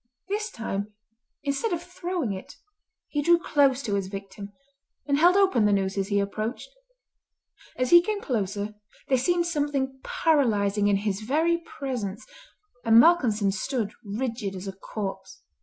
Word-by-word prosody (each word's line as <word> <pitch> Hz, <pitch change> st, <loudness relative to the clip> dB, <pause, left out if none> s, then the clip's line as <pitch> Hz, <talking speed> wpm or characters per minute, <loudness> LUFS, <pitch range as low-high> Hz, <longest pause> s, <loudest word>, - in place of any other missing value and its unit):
This 425 Hz, +2 st, -1 dB
time, 205 Hz, -, -5 dB, 0.5 s
instead 285 Hz, +10 st, -1 dB
of 340 Hz, 0 st, -3 dB
throwing 355 Hz, -, -3 dB
it, 190 Hz, -, -9 dB, 0.5 s
he 295 Hz, -, -1 dB
drew 345 Hz, +4 st, +5 dB
close 280 Hz, -5 st, +2 dB
to 210 Hz, -, -2 dB
his 200 Hz, -2 st, -1 dB
victim, 200 Hz, +1 st, -8 dB, 0.5 s
and 280 Hz, 0 st, +1 dB
held 355 Hz, +4 st, +6 dB
open 375 Hz, -, +4 dB
the 210 Hz, -, +4 dB
noose 195 Hz, -1 st, +1 dB
as 195 Hz, -1 st, -1 dB
he 200 Hz, -1 st, +1 dB
approached. 215 Hz, -, -3 dB, 1.0 s
As 255 Hz, 0 st, -1 dB
he 345 Hz, 0 st, +9 dB
came 420 Hz, +3 st, -2 dB
closer 210 Hz, -, -2 dB, 0.4 s
there 260 Hz, -, +4 dB
seemed 345 Hz, +6 st, +1 dB
something 285 Hz, -5 st, -1 dB
paralysing 210 Hz, -10 st, +2 dB
in 205 Hz, -, +3 dB
his 200 Hz, 0 st, -2 dB
very 320 Hz, +9 st, +1 dB
presence, 250 Hz, -, -5 dB, 0.6 s
and 225 Hz, 0 st, +5 dB
Malcolmson 235 Hz, -, +4 dB
stood 215 Hz, +2 st, -2 dB
rigid 220 Hz, -1 st, -3 dB
as 185 Hz, +1 st, -7 dB
a 195 Hz, -, -4 dB
corpse. 195 Hz, -1 st, -7 dB
230 Hz, 150 wpm, -26 LUFS, 200-300 Hz, 1.0 s, he